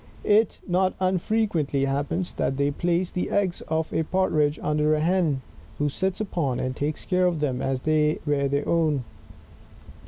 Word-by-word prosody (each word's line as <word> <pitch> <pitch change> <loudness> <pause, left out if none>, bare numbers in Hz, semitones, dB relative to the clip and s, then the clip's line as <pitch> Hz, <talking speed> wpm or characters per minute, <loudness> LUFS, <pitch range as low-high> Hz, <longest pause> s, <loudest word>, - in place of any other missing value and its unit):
It 215 +1 +3
not 185 +1 +1
unfrequently 185 -6 +1
happens 145 +6 -1
that 135 - -1
they 140 +1 +1
place 175 +4 0
the 180 - -2
eggs 195 -4 0
of 160 0 -1
a - - +1
Partridge 155 -4 +1
under 150 0 +2
a - - 0
hen, 165 -4 +1 0.4
who 145 0 +1
sits 190 +6 -2
upon, 165 - -1
and 130 0 -2
takes 150 +1 -3
care 180 -1 +2
of 170 -3 -1
them 130 -4 -1
as 135 0 0
if - - -25
they 155 0 +2
were 140 -2 +1
her 140 +1 -1
own. 155 -5 +1
155 Hz, 175 wpm, -25 LUFS, 145-180 Hz, 0.4 s, It